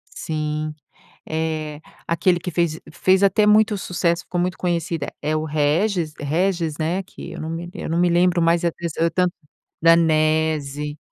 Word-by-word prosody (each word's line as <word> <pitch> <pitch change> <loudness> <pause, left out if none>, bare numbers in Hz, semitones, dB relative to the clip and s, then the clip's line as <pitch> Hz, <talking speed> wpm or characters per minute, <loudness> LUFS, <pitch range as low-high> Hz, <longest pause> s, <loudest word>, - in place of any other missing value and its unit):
Sim, 155 0 -3 0.6
eh, 155 -1 -3 0.3
aquele 175 +1 +2
que 180 - -5
fez 170 -1 0
fez 190 +2 +3
até 200 +2 +4
muito 210 0 +4
sucesso, 170 -2 -1
ficou 175 - -3
muito 180 +1 -1
conhecida 170 -4 -2
é 155 +1 0
o 155 - -1
Régis 155 +3 0
Régis, 165 +1 0
né? 175 +5 -1
Que - - -10
eu - - -7
não 160 - -4
me 165 +1 -4
lem 175 - -8
eu - - -4
não 170 +1 0
me 175 0 +4
lembro 175 0 +3
mais 170 +1 +3
é 170 - +2
desse 170 -2 -6
Eutan 175 +2 +2 0.5
Danese! 155 -3 +2
165 Hz, 165 wpm, -22 LUFS, 155-180 Hz, 0.6 s, até